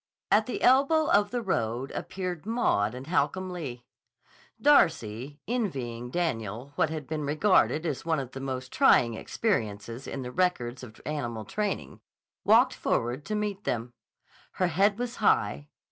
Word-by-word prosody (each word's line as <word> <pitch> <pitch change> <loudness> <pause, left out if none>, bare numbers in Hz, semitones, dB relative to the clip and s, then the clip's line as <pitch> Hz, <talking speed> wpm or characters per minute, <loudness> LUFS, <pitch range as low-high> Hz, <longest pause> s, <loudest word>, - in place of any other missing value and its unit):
At 215 +1 +4
the 250 - -4
elbow 285 +5 +4
of 205 0 +4
the 240 +1 -2
road 125 - -1
appeared 185 -1 -5
Maud 125 - +1
and 130 +1 -7
Holcomb 185 +2 0
Lee. 135 -9 -6 0.8
Darcy, 145 - +3
envying 130 - -2
Daniel 125 - -3
what 155 - +2
has 155 -1 -4
been 155 +2 -4
regarded 155 +2 +3
as 150 -5 -2
one 160 -2 0
of 130 -2 -5
the 135 - -7
most 130 -1 -5
trying 115 -1 +5
experiences 115 - -2
in 135 - -4
the 125 - -6
records 130 -8 0
of 110 -4 -11
animal 120 -8 -3
training, 205 - -3 0.4
walked - - +5
forward 120 +5 -1
to 215 +2 -2
meet 210 -1 -2
them. 120 +1 -2 0.6
Her 185 -1 +1
head 195 +5 +3
was 245 0 -4
high. 145 - +2
150 Hz, 150 wpm, -28 LUFS, 120-195 Hz, 0.8 s, trying